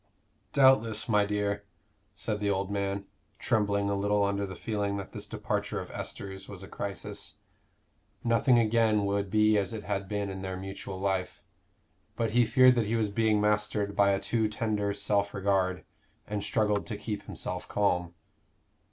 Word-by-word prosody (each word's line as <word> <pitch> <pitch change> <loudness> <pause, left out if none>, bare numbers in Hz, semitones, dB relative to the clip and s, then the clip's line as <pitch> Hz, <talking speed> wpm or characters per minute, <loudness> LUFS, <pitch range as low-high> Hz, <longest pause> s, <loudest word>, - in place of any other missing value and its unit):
"Doubtless, 115 -6 +4
my 105 -3 +3
dear," 100 0 -1 0.5
said 105 -2 -3
the 105 -1 0
old 100 0 0
man, 100 0 -2 0.3
trembling 100 -2 +1
a 100 - +1
little 100 +1 +2
under 100 0 0
the 95 - -7
feeling 100 0 -2
that 100 - -6
this - - -7
departure - - -2
of - - -7
Esther's 95 -1 -6
was 100 -1 -8
a - - -8
crisis. 100 0 -6 0.9
Nothing 120 +1 +4
again 110 -2 +3
would 100 0 0
be 110 0 +4
as 100 +1 -2
it 110 -2 -5
had 100 -2 -2
been 100 -1 -2
in 95 0 -6
their 95 -1 -4
mutual 95 0 -6
life. 95 -1 -2 0.7
But 115 -2 0
he 120 0 +4
feared 130 +1 +7
that 115 -4 0
he 115 - 0
was 110 -2 +1
being 110 0 +2
mastered 105 -1 +1
by 100 -1 +5
a 100 0 +2
too 110 +2 0
tender 105 -1 -1
self 100 0 0
regard, 95 -2 +1 0.4
and 105 -1 -3
struggled 105 0 +1
to 105 - -3
keep 105 -1 -5
himself 90 0 -4
calm. 90 -4 0
100 Hz, 170 wpm, -29 LUFS, 100-110 Hz, 0.9 s, feared